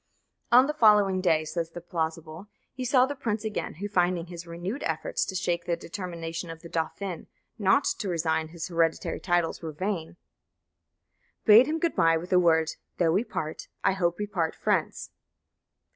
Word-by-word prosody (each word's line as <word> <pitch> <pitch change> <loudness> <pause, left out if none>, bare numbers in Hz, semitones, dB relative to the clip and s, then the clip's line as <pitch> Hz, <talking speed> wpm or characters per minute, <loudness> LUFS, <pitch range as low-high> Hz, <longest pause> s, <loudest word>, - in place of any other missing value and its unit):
On 250 +2 +8
the 300 - -1
following 210 -7 +4
day, 160 -4 +2
says 165 +1 -3
"the 170 - -8
plausible," 165 +1 -4 0.3
he 255 - -5
saw 255 0 +4
the 285 - -4
prince 225 -5 -3
again, 215 - -3
who, 200 +6 -4
finding 180 -3 +1
his 175 0 -9
renewed 175 +10 -5
efforts - - -1
to 190 - -6
shake 175 -2 -1
the 170 - 0
determination 170 -2 -6
of 165 +1 -9
the 170 - -9
dauphin 165 +2 -4 0.3
not 195 -2 +4 0.2
to 200 - -3
resign 160 -2 0
his 165 0 -6
hereditary 165 -2 0
titles 175 -2 0
were 160 -2 -5
vain, 175 0 -4 1.3
bade 225 +4 +8
him 315 +1 0
good 330 0 -1
bye 165 0 +4
with 175 +3 -7
the 180 - +6
words, 160 -2 +2 0.2
"Though 170 -2 +3
we 195 +7 +2
part, 155 -9 -5 0.2
I - - +4
hope 175 -2 0
we 210 - -2
part 175 -6 -2
friends." - - -1
175 Hz, 175 wpm, -27 LUFS, 165-205 Hz, 1.3 s, On